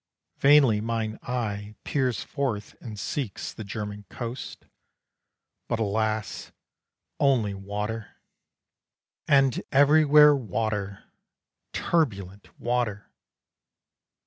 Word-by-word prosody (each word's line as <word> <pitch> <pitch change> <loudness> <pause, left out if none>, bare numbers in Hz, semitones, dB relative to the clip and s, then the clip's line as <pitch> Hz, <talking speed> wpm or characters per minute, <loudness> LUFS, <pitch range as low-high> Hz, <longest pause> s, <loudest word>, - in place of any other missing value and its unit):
Vainly 135 -7 +5
mine 110 -1 -2
eye 105 -4 -4
peers 130 -5 0
forth 115 -8 -3
and 110 -3 -8
seeks 125 -2 -4
The 110 - -7
German 105 0 -6
coast. 120 +1 -7 1.0
But 115 - -1
alas! 110 -1 -2 0.7
only 120 -8 +2
water, 105 +3 -5 1.1
And 135 -3 +4
everywhere 150 +1 +6
water 105 -4 -3 0.7
turbulent 100 - -1
water! 120 -4 -2
110 Hz, 80 wpm, -26 LUFS, 105-135 Hz, 1.1 s, everywhere